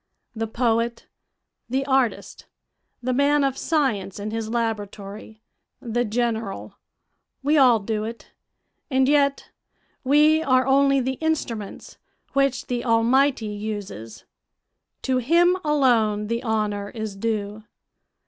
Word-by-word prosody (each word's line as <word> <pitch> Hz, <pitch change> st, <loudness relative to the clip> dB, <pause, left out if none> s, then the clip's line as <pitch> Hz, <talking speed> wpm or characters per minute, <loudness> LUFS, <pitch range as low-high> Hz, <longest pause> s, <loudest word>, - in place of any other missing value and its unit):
The 225 Hz, 0 st, -2 dB
poet, 230 Hz, 0 st, 0 dB, 0.6 s
the 265 Hz, +2 st, -1 dB
artist, 265 Hz, -3 st, -1 dB, 0.6 s
the 255 Hz, +1 st, 0 dB
man 285 Hz, +2 st, +3 dB
of 270 Hz, -1 st, 0 dB
science 260 Hz, -, -1 dB
in 210 Hz, +1 st, -4 dB
his 225 Hz, -1 st, -3 dB
laboratory, 215 Hz, -1 st, -4 dB, 0.4 s
the 240 Hz, -2 st, -1 dB
general, 225 Hz, -2 st, -3 dB, 0.6 s
we 295 Hz, +3 st, +2 dB
all 255 Hz, -5 st, +6 dB
do 215 Hz, +1 st, -3 dB
it; 230 Hz, +1 st, -9 dB, 0.6 s
and 260 Hz, -1 st, +2 dB
yet 280 Hz, -1 st, +2 dB, 0.5 s
we 300 Hz, +3 st, +4 dB
are 255 Hz, -4 st, +3 dB
only 275 Hz, 0 st, +3 dB
the 260 Hz, +1 st, -3 dB
instruments 240 Hz, -10 st, -3 dB, 0.3 s
which 275 Hz, -1 st, +1 dB
the 245 Hz, -1 st, -3 dB
Almighty 245 Hz, +2 st, +2 dB
uses; 205 Hz, -, -6 dB, 0.8 s
to 260 Hz, -1 st, +1 dB
Him 340 Hz, +8 st, +3 dB
alone 235 Hz, -8 st, +2 dB
the 230 Hz, 0 st, -1 dB
honor 210 Hz, -4 st, -1 dB
is 220 Hz, -3 st, -6 dB
due. 210 Hz, 0 st, -3 dB
235 Hz, 115 wpm, -23 LUFS, 215-270 Hz, 0.8 s, all